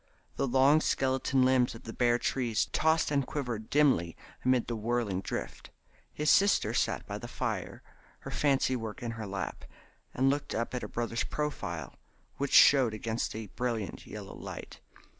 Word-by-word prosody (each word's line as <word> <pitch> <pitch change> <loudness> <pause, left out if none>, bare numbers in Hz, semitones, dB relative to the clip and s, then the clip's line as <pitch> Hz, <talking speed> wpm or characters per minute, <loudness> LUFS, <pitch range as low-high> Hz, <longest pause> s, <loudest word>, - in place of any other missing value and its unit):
The - - 0
long 135 +4 +5
skeleton 130 -1 +1
limbs 130 -2 +3
of 115 - -12
the 115 - -7
bare 120 -1 +3
trees 120 -5 0
tossed 160 -1 +2
and 140 -1 +2
quivered 120 -6 -4
dimly 130 - +2 0.3
amid 130 -2 +3
the 120 - -3
whirling 110 -4 -1
drift. - - -5 0.4
His 150 +1 +1
sister 200 0 +4
sat - - 0
by - - -5
the - - -7
fire, - - -4 0.4
her - - -7
fancy 135 -3 +2
work 115 -1 -6
in 120 - -2
her 110 -2 -6
lap, 95 0 -5 0.5
and 130 +2 +2
looked 140 +1 0
up 115 +2 -2
at 125 - -2
her - - -5
brothers 115 0 -2
profile 85 - -4 0.4
which 140 0 -2
showed 130 -6 +6
against 110 +1 -3
the 110 0 -5
brilliant 115 -5 -3
yellow - - -8
light. - - -8
125 Hz, 165 wpm, -30 LUFS, 115-135 Hz, 0.5 s, showed